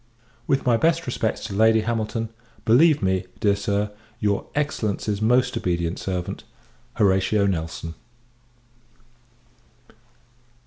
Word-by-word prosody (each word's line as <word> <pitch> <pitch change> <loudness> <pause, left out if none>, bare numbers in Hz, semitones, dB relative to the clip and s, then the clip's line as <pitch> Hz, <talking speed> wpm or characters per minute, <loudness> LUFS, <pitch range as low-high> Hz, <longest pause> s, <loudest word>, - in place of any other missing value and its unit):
With 135 - +1
my 120 -2 +4
best 165 +4 +2
respects 115 -3 -2
to 110 - -5
Lady 110 +2 +4
Hamilton, 115 0 -2 0.4
believe 145 +4 +5
me, 95 -1 +1
dear 100 -1 +3
Sir, 100 +1 -1 0.3
your 105 -2 0
Excellency's 110 -8 -1
most 125 +3 +3
obedient 85 -1 -1
servant, 90 -2 -4 0.5
HORATIO 100 +1 +3
NELSON. 80 -3 -3
105 Hz, 100 wpm, -23 LUFS, 95-115 Hz, 0.5 s, believe